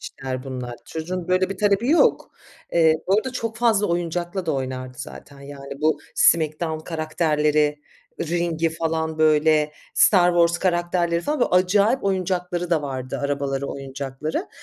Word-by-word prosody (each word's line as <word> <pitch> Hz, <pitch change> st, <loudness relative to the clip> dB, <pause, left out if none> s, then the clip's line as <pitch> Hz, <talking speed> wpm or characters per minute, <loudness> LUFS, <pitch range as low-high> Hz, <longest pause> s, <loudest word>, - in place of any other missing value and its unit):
işler 130 Hz, -2 st, -6 dB
bunlar. 125 Hz, -2 st, -6 dB
Çocuğun 175 Hz, +2 st, -5 dB
böyle 185 Hz, +1 st, +2 dB
bir 195 Hz, -, -5 dB
talebi 205 Hz, +3 st, +2 dB
yok. 330 Hz, -, +3 dB, 0.4 s
Eee, 160 Hz, -2 st, +5 dB
bu 190 Hz, -, +3 dB
arada 250 Hz, +4 st, -1 dB
çok 230 Hz, -3 st, -4 dB
fazla 225 Hz, -3 st, +2 dB
oyuncakla 175 Hz, +1 st, -2 dB
da -, -, +1 dB
oynardı 130 Hz, -2 st, -4 dB
zaten, 140 Hz, +1 st, -10 dB
yani, 140 Hz, 0 st, -9 dB
bu 155 Hz, -1 st, +2 dB, 0.2 s
Smackdown 160 Hz, 0 st, +2 dB
karakterleri, 150 Hz, -2 st, 0 dB, 0.4 s
ring'i 165 Hz, -1 st, 0 dB
falan, 160 Hz, 0 st, -2 dB
böyle, 155 Hz, -1 st, +3 dB, 0.2 s
Star 180 Hz, -3 st, +5 dB
Wars 170 Hz, 0 st, +3 dB
karakterleri, 175 Hz, -1 st, 0 dB
falan, 295 Hz, -, -2 dB
böyle, -, -, +2 dB
acayip 200 Hz, +7 st, +3 dB
oyuncakları 180 Hz, -2 st, -1 dB
da 160 Hz, -3 st, +2 dB
vardı 130 Hz, -2 st, -4 dB
arabaları, 140 Hz, -1 st, -2 dB
oyuncakları. 140 Hz, -, -5 dB
165 Hz, 140 wpm, -23 LUFS, 145-180 Hz, 0.4 s, Eee